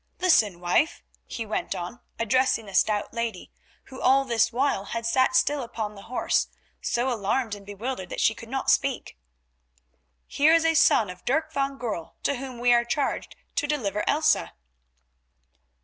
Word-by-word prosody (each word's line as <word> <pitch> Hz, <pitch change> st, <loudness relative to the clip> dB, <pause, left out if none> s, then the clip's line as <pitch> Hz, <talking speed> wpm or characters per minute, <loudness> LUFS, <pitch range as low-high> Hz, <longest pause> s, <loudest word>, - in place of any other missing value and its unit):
Listen, 220 Hz, -, +3 dB
wife," 180 Hz, -, +1 dB, 0.2 s
he 225 Hz, -, -5 dB
went 215 Hz, -, -3 dB
on, 180 Hz, +7 st, -6 dB, 0.2 s
addressing 230 Hz, 0 st, +1 dB
the 200 Hz, -, -11 dB
stout 210 Hz, +1 st, +1 dB
lady, 230 Hz, -1 st, -4 dB, 0.3 s
who 260 Hz, -, -11 dB
all 270 Hz, +1 st, +4 dB
this 235 Hz, -3 st, +2 dB
while 245 Hz, -5 st, 0 dB
had 230 Hz, +1 st, -4 dB
sat 260 Hz, +2 st, +2 dB
still 290 Hz, +2 st, +2 dB
upon 220 Hz, -3 st, -5 dB
the 200 Hz, -, -12 dB
horse, 250 Hz, -, +1 dB, 0.3 s
so 245 Hz, +2 st, 0 dB
alarmed 220 Hz, +2 st, -1 dB
and 200 Hz, -1 st, -9 dB
bewildered 205 Hz, -2 st, -5 dB
that -, -, -5 dB
she 220 Hz, -, +3 dB
could 230 Hz, +1 st, -12 dB
not 270 Hz, +1 st, +1 dB
speak, 275 Hz, -3 st, 0 dB, 1.1 s
"here 300 Hz, +3 st, +3 dB
is 330 Hz, 0 st, +2 dB
a 325 Hz, -, +4 dB
son 220 Hz, -, +4 dB
of 180 Hz, -, -13 dB
Dirk 315 Hz, +4 st, 0 dB
van 275 Hz, -1 st, -1 dB
Goorl, 220 Hz, -10 st, -5 dB
to 280 Hz, -, 0 dB
whom 260 Hz, -1 st, -7 dB
we 245 Hz, 0 st, +4 dB
are 235 Hz, 0 st, +4 dB
charged 275 Hz, +4 st, -2 dB, 0.2 s
to 290 Hz, -, 0 dB
deliver 210 Hz, -9 st, -1 dB
Elsa." 310 Hz, +2 st, +2 dB
240 Hz, 165 wpm, -26 LUFS, 210-270 Hz, 1.1 s, all